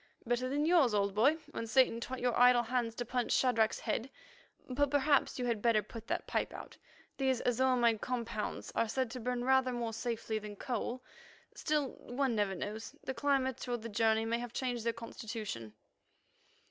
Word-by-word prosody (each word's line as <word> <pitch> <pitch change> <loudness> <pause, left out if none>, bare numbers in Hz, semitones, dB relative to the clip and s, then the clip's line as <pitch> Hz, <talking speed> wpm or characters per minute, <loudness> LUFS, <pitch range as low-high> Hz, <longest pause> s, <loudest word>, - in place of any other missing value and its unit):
"Better 245 +2 0
than 290 +3 +1
yours, 315 -10 +4
old 200 -1 +1
boy, 250 +9 +4 0.2
when 230 - -4
Satan 250 -1 +4
taught 255 +2 -5
your 245 -1 +1
idle 245 0 +6
hands 235 -1 -1
to 240 - -3
punch 245 0 -1
Shadrach's 230 -4 +2
head. 245 +4 -2 0.6
But 285 +2 +1
perhaps 285 0 +2
you 250 - -2
had 230 -3 0
better 225 -2 +3
put 230 +2 -10
that - - -2
pipe - - -1
out. - - -9 0.4
These 265 -3 +1
azo 255 +1 +3
imide 235 -3 +3
compounds 235 -4 -3
are 230 - +1
said 255 0 -1
to 255 - -5
burn 245 +1 -2
rather 265 0 +3
more 235 -2 -3
safely 225 -1 -2
than 210 -1 -8
coal. 250 +2 -3 0.5
Still, 300 -3 0
one 260 0 -1
never 205 -3 0
knows; 210 +4 -6
the 265 - -3
climate 265 -1 0
or 245 -1 0
the 230 0 -7
journey 220 +1 +2
may 230 +1 0
have 240 -1 -6
changed 245 -3 -2
their - - +4
constitution." 215 - -6
240 Hz, 185 wpm, -33 LUFS, 225-260 Hz, 0.6 s, idle